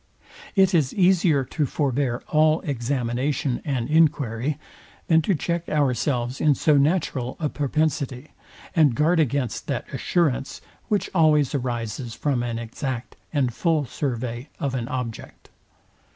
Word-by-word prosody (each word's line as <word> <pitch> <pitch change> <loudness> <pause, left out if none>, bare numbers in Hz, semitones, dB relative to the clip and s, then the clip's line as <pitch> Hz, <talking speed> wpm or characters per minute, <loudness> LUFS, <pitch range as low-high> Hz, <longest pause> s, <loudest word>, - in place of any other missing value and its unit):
It 190 -1 +4
is 150 -6 +2
easier 180 -6 +4
to 150 +2 -1
forbear 135 -3 -1
all 155 +1 +3
examination 130 0 -1
and 130 -6 -2
enquiry, 145 -4 +2 0.5
than 160 -1 +4
to 185 +4 +1
check 170 +2 -2
ourselves 130 -3 0
in 150 -2 +4
so 150 +2 +3
natural 140 -4 +1
a 155 -3 0
propensity, 145 -2 -1 0.4
and 150 -7 +4
guard 165 +5 +3
against 140 -5 -1
that - - -2
assurance, 150 -6 0 0.3
which 205 -2 0
always 155 -5 +4
arises 120 -2 -3
from 140 -5 0
an 120 -1 -3
exact 120 +2 -5 0.2
and 135 -6 0
full 160 +1 +1
survey 125 0 -4
of 140 -2 -2
an 120 -3 -2
object. 125 -3 -6
140 Hz, 130 wpm, -24 LUFS, 125-155 Hz, 0.5 s, It